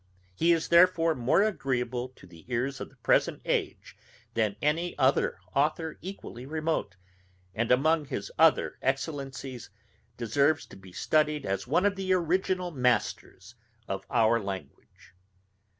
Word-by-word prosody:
He 165 - +2
is 165 -1 +1
therefore 170 -1 +5
more 130 +8 +2
agreeable 125 - -1
to - - -16
the 85 -3 -15
ears 130 +3 -1
of - - -6
the - - -24
present - - +1
age - - -2 0.4
than 110 -3 0
any 165 +4 0
other 135 -1 +2 0.2
authour 155 +3 0
equally 180 -9 -8
remote, 155 - -2 0.6
and 115 +2 -1
among 155 +4 +3
his 100 -7 -5
other 160 -1 +4
excellencies 135 -2 -3 0.5
deserves 140 +7 +1
to - - -14
be 95 -1 -14
studied 150 +8 +1
as 95 +3 -2
one 170 +9 +2
of 200 -1 +2
the 190 -1 0
original 180 +1 0
masters 125 - -1 0.3
of 95 0 -4
our 115 -1 +3
language. 95 -8 -9
140 Hz, 135 wpm, -28 LUFS, 120-165 Hz, 0.6 s, therefore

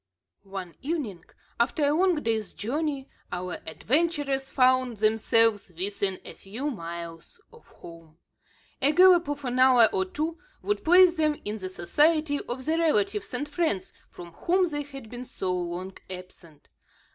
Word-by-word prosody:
One 190 -3 -6
evening, 270 - -4 0.3
after 270 +5 +1
a 285 - +3
long 360 +2 +3
day's 220 -2 -1
journey, 280 +4 -3 0.2
our 180 0 -4
adventurers 275 - 0
found 255 -2 +2
themselves 220 -1 +2
within 195 0 -1
a - - -8
few 245 +10 -5
miles 170 - -8
of 465 - -18
home. 165 -2 -14 0.6
A 290 +2 +4
gallop 360 -2 +6
of 290 -1 -4
an 250 0 -1
hour 255 -3 +7
or 190 0 +1
two, 315 - -4 0.2
would 415 - -1
place 355 +1 +6
them 305 -1 +1
in 210 +1 -3
the 185 -1 -5
society 295 - +2
of 255 +1 -4
the 320 +1 +1
relatives 210 -10 +1
and 290 +4 -2
friends 295 - -1 0.2
from 175 -1 -11
whom 360 - +1
they 295 -3 -3
had 275 -4 -10
been 245 +2 -7
so 190 -6 -3
long 180 +2 -4
absent. 180 -4 -11
250 Hz, 150 wpm, -27 LUFS, 190-300 Hz, 0.6 s, hour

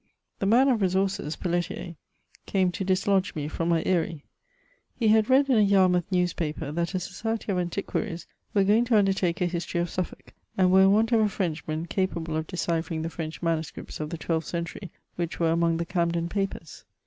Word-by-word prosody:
The 195 - 0
man 245 +6 +5
of 245 -4 +2
resources^ 190 -5 0
Pelletier, 175 0 -2 0.5
came 190 -2 +2
to 195 - -4
dislodge 190 0 +1
me 150 -2 -3
from 165 +2 -2
my 165 -1 +2
aSrie. 165 -4 0 0.7
He 225 -3 +2
had 220 +1 +4
read 270 +2 +5
in 255 -5 +4
a - - +5
Yarmouth 190 -3 +3
newspaper 175 -5 -1
that 170 +4 -2
a - - +1
society 220 +4 -3
of 185 - 0
antiquaries 175 -1 -3 0.3
were 200 - +5
going 215 +5 +4
to 235 -2 +3
undertake 190 -4 +1
a - - +3
history 175 0 -2
of 175 0 -1
Suffolk^ 185 -2 -5 0.3
and 185 -1 +4
were 190 +1 +6
in 195 0 +6
want 220 +3 +3
of 230 - +4
a 215 -1 +3
Frenchman 160 -4 -3
capable 170 -4 -2
of 160 0 -2
deciphering 165 -3 -2
the 165 - -4
French 160 0 -6
manuscripts 165 -1 -3
of 150 -1 -3
the 170 - -5
twelfth 160 0 -2
century, 170 +2 -5 0.3
which 170 -1 -3
were 165 -1 +2
among 165 0 +2
the 170 - -2
Camden 170 -1 0
papers. 195 -5 -4
180 Hz, 195 wpm, -26 LUFS, 165-195 Hz, 0.7 s, were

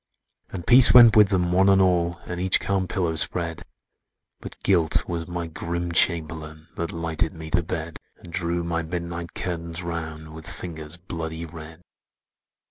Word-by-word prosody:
"And 90 -3 -7
peace 125 0 +8
went 120 -1 +9
with 105 -2 +7
them, 90 -3 0
one 95 +2 +3
and 95 0 +5
all, 90 -2 +1
And 90 0 -5
each 95 +1 +4
calm 95 -2 -1
pillow 90 -5 -2
spread; 85 0 -1 0.8
But - - -10
Guilt 85 -5 +2
was 85 -1 -4
my 85 -1 -4
grim 85 +1 -5
Chamberlain 80 -1 0
That 85 +3 -2
lighted 80 -1 -2
me 80 -1 -9
to 90 - +3
bed; 80 0 -6 0.2
And 85 - -14
drew 85 -1 -2
my 85 -1 -2
midnight 85 0 -6
curtains 85 0 -3
round 80 -2 -6
With 80 -2 -7
fingers 80 -2 -6
bloody 80 -2 -6
red! 80 +1 -12
85 Hz, 160 wpm, -24 LUFS, 80-90 Hz, 0.8 s, went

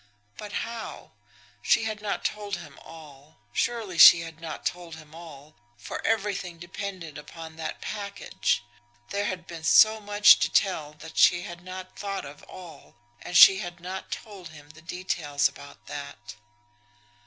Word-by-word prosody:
But 210 -1 -9
how? 230 -1 -8 0.5
She 105 - +3
had 215 -1 -4
not 210 -1 -3
told 205 -2 -2
him 150 -6 -11
all 150 -2 -14 0.2
surely 215 -8 -2
she 170 - +10
had 165 -1 -9
not 160 -2 -7
told 175 -2 -4
him 155 -1 -15
all, 155 -2 -12 0.2
for - - -7
everything 200 -5 -1
depended 175 -3 -7
upon 160 +1 -11
that 160 - -6
package. 200 - -2 0.5
There 200 +1 -1
had 185 -4 -4
been 165 -2 -9
so 220 +6 +6
much 205 0 +6
to - - +1
tell 155 -6 0
that 160 +1 -8
she 175 0 +5
had 175 0 -9
not 185 0 -9
thought 195 -1 -4
of 145 +1 -11
all, 180 -3 -13 0.3
and 175 - -1
she 190 +2 +9
had 175 -1 -7
not 185 +2 -7
told 195 -6 -8
him 150 -1 -14
the 155 0 -17
details 155 -4 -1
about 140 - -14
that. 140 -8 -8
175 Hz, 155 wpm, -26 LUFS, 155-200 Hz, 0.5 s, she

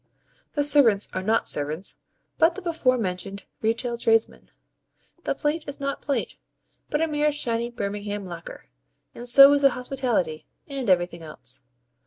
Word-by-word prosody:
The 290 - +1
servants 275 -9 +6
are 185 - -2
not 220 +4 0
servants, 150 +5 -1 0.4
but 335 +1 +4
the 395 - -7
before 320 -7 +1
mentioned 195 -1 -5 0.2
retail 235 +2 -1
tradesmen. 225 -1 +1 0.8
The - - -1
plate 300 +1 -2
is 285 +1 -6
not 275 0 -4
plate, 280 - -3 0.5
but 300 - -1
a - - +1
mere 300 0 0
shiny 235 -5 -1
Birmingham 205 -2 -5
lacquer; 170 -2 -10 0.5
and 245 +1 -6
so 275 +3 +9
is 285 - +2
the 275 - +6
hospitality, 245 - -3 0.2
and 270 -6 -4
everything 175 -2 +1
else. 130 -6 -7
235 Hz, 150 wpm, -24 LUFS, 195-280 Hz, 0.8 s, so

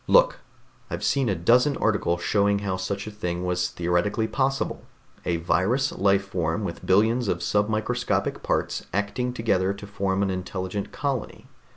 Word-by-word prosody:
"Look, - - +5 0.5
I've - - -4
seen 135 -4 +2
a 100 - +1
dozen 125 - +3
articles 85 -5 +1
showing 100 -1 +3
how 95 -2 0
such 100 +2 -3
a 110 - -6
thing 90 -4 -3
was 90 0 0
theoretically 90 +5 0
possible... 135 +4 -1 0.4
a 90 - +1
virus 95 - +1
life 100 0 +2
form 90 +1 -1
with 85 -4 -5
billions 110 +5 +3
of - - +1
submicroscopic 110 +4 0
parts - - -1
acting 105 +6 -1
together 100 -6 +1
to 100 - -9
form 100 -1 -1
an 95 - 0
intelligent 95 +1 -4
colony. 140 -5 -3
100 Hz, 155 wpm, -25 LUFS, 95-115 Hz, 0.5 s, Look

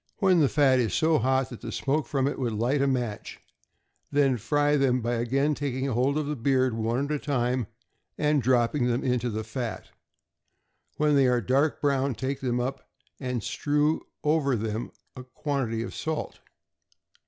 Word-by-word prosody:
When 190 -4 +4
the 145 -4 +4
fat 135 -3 +4
is 115 -3 0
so 160 0 +3
hot 130 +1 +1
that 120 - -9
the - - -6
smoke 135 +8 -1
from 135 -2 0
it 140 - -3
would 120 -4 -1
light 120 +6 +1
a 140 - +2
match, 120 -6 -3 0.7
then 140 -2 +3
fry 145 +7 +1
them 135 -3 +2
by 120 0 -1
again 135 +6 +1
taking 135 -2 -2
hold 135 +2 +1
of 155 - -1
the 150 +1 -2
beard, 130 0 +1
one 115 +4 -1
at 145 - -5
a 150 - 0
time, 125 -5 -1 0.5
and 150 -1 +2
dropping 125 +1 +2
them 120 +1 0
into 125 -2 0
the 110 0 -3
fat. 115 +1 -5 1.1
When 150 -1 +3
they 135 -2 +5
are 125 -1 +3
dark 135 +7 +1
brown, 140 -2 +1
take 130 +4 -3
them 125 -2 0
up, 125 +2 -4 0.3
and 125 -4 -3
strew 150 +1 0 0.2
over 150 -3 +2
them 110 +1 -3 0.2
a 125 - -8
quantity 130 -3 -2
of - - -7
salt. 160 -1 -4
130 Hz, 175 wpm, -27 LUFS, 120-145 Hz, 1.1 s, they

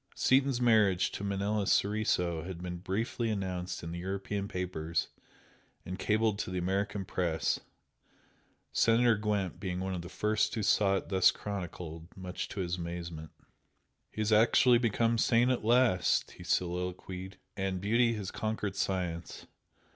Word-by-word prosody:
Seaton's 135 -1 +3
marriage 110 -6 +3
to - - -6
Manella 100 +1 -1
Soriso 95 -5 +1
had 90 0 -6
been 90 -1 -4
briefly 110 +6 -2
announced 95 -4 -3
in 85 - -5
the 85 - -5
European 100 +2 -3
papers 85 -4 -2 0.8
and 90 +1 -6
cabled 105 0 +1
to - - -3
the 90 - -3
American 95 +2 -1
Press, 80 -4 0 1.1
Senator 115 +1 +4
Gwent 105 -3 -1
being 90 -2 -3
one 95 0 -2
of 90 - -3
the 85 - -9
first 105 +3 0
who 110 - -1
saw 100 0 +3
it - - -3
thus 95 -2 +5
chronicled, 90 -5 -6
much 90 -1 -5
to 100 - -4
his 90 0 -2
amazement. 85 -2 -6 0.8
"He 110 - -5
has 110 +1 0
actually 120 +3 +5
become 115 0 +1
sane 120 +3 +4
at 125 - -1
last!" 115 -7 +3
he 90 - -12
soliloquised, 90 +1 -2 0.2
"And 95 -1 -2
beauty 115 +4 +2
has 105 -4 -4
conquered 110 -2 -3
science! 90 -3 -3
95 Hz, 145 wpm, -31 LUFS, 90-110 Hz, 1.1 s, thus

